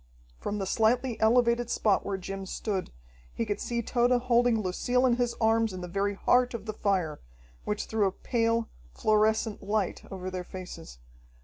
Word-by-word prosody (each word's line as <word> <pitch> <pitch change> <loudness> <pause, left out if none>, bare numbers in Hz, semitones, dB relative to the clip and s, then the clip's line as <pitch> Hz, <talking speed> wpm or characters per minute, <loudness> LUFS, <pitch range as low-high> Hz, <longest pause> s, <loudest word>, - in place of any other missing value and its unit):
From 210 - -3
the 195 - -2
slightly 235 +5 +2
elevated 235 +1 +3
spot 205 -3 +2
where 195 -1 -2
Jim 195 +1 -6
stood, 195 -1 -3 0.4
he 230 - -1
could 205 -2 -2
see 235 -1 -2
Tode 240 +2 +2
holding 240 -2 +3
Lucille 245 +6 +1
in 240 -2 +3
his 245 -1 0
arms 225 -1 +2
in 185 - -6
the 180 - -5
very 200 +3 -1
heart 250 +4 +2
of 215 -3 -6
the 215 - -4
fire, 185 -8 0 0.5
which 210 - -2
threw 215 -3 +1
a - - -1
pale, 230 +2 0 0.3
fluorescent 215 0 +2
light 205 -1 -1
over 185 -1 -5
their 185 -1 -4
faces. 180 - -9
215 Hz, 175 wpm, -28 LUFS, 195-235 Hz, 0.5 s, elevated